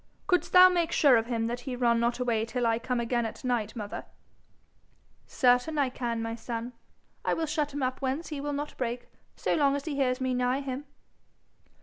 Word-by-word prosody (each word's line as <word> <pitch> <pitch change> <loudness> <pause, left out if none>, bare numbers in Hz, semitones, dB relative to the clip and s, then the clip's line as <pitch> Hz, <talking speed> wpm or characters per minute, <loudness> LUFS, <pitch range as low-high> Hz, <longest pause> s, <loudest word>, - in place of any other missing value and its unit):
'Couldst 360 -2 +1
thou 365 0 +9
make 345 -2 +1
sure 280 -4 +5
of 225 0 +1
him 230 -2 -1
that 240 +1 -2
he 250 0 -5
run 235 -2 +2
not 235 +1 +1
away 235 -3 0
till 240 +2 -2
I 225 0 +2
come 250 +1 -2
again 235 0 0
at 225 +3 -6
night, 240 -4 -1
mother?' 210 -3 -6 1.2
'Certain 250 +4 +2
I 280 -3 +2
can, 235 -3 -3
my 225 0 -3
son. 230 +1 -5 0.5
I - - +1
will 325 - -1
shut 300 -1 -1
him 285 -1 -3
up 255 +1 -2
whence 270 +5 -2
he 295 -3 -4
will 290 +1 -3
not 290 +1 -4
break 245 -1 -3 0.3
so - - -1
long 280 -3 +3
as 285 - -4
he 315 - -3
hears 255 -2 +1
me 260 -1 0
nigh 250 +2 +1
him.' 275 +1 -5
250 Hz, 210 wpm, -28 LUFS, 235-285 Hz, 1.2 s, thou